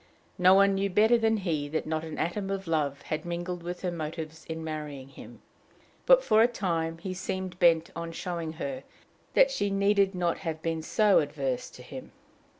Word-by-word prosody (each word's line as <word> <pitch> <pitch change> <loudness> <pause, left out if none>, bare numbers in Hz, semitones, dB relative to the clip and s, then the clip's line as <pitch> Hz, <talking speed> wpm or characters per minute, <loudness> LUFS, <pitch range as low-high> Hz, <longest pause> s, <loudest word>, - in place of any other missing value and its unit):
No 185 +1 +7
one 200 0 +5
knew 195 +1 0
better 215 +5 +4
than 225 0 +2
he 160 -7 -2
that 155 +1 -2
not 155 0 -2
an 160 -1 -7
atom 195 +4 -2
of 195 0 -3
love 150 -4 -1
had 155 - -3
mingled 175 0 -4
with 175 +1 -6
her 180 - 0
motives 160 -1 -6
in 160 0 -5
marrying 150 -4 -6
him; - - -13 0.6
but - - +7
for 215 +1 +4
a 230 - +6
time 165 -8 -2
he 185 +2 -5
seemed 185 -1 -4
bent 165 -2 +4
on 170 0 -5
showing 165 -1 -4
her 260 - -5 0.5
that - - +6
she 205 - 0
needed 200 0 +2
not 175 -2 0
have 160 -3 -4
been 165 -1 -1
so 205 +4 +4
averse 140 -4 -2
to - - -13
him. - - -10
175 Hz, 190 wpm, -28 LUFS, 160-195 Hz, 0.6 s, No